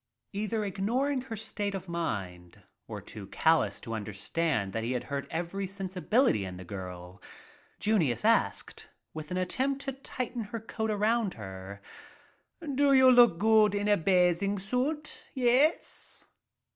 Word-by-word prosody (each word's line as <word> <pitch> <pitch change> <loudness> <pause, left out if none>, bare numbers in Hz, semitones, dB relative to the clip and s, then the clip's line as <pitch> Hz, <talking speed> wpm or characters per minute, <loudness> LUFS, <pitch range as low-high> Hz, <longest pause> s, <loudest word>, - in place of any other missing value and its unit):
Either 215 +1 -1
ignoring 245 +8 0
her 245 -3 -6
state 205 -2 -3
of 190 - -6
mind 95 - -4 0.2
or - - -6
too 100 -3 -10
calloused 155 -4 +2
to 115 - -5
understand 110 +2 -1
that 115 - -2
he 120 +3 -1
had 125 - -2
hurt 140 -1 -4
every 175 +4 -3
sensibility 195 - +1
in 95 -1 -6
the 95 - -9
girl, 90 0 -8 0.6
Junius 200 - +1
asked, 230 +1 +1 0.2
with 155 0 -7
an 180 - -2
attempt 265 +9 -1
to 270 - -3
tighten 250 -3 -4
her 225 +3 -5
coat 220 0 -4
around 215 -1 +1
her: 95 -1 -9 0.8
"How 335 - -10 0.3
you 260 -1 +7
look 220 -2 +5
in 205 0 0
a 205 - +5
bathing 180 +2 +2
suit, 265 +10 -2
yes 260 +5 +1
195 Hz, 140 wpm, -29 LUFS, -, 0.8 s, you